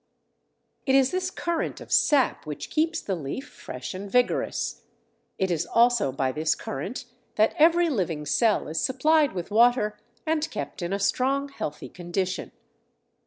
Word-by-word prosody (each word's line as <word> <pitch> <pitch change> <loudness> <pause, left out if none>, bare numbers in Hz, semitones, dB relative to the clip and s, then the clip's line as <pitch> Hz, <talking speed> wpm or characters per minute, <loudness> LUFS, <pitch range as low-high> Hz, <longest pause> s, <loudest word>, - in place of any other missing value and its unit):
It 265 - +4
is 270 0 +4
this 370 0 -1
current 340 -3 -2
of - - -12
sap 275 - +3
which 150 - -6
keeps 320 +2 +1
the 195 - -3
leaf 170 - -5
fresh 125 - -8
and 195 +2 -6
vigorous; 250 0 0 0.6
it 190 -1 0
is 165 -2 -1
also 235 - +3
by 130 0 -1
this 155 +3 0
current 190 - -5 0.3
that 215 - +3
every 340 +2 +5
living 175 - -1
cell 215 +9 +2
is 160 +1 -2
supplied 300 +3 +3
with 180 +1 -5
water 220 -2 +3 0.3
and 315 -1 0
kept 145 +4 -6
in 175 +1 -3
a 200 - +1
strong, 270 +7 +1
healthy 150 - -6
condition. 180 +1 -3
215 Hz, 155 wpm, -26 LUFS, 170-275 Hz, 0.6 s, every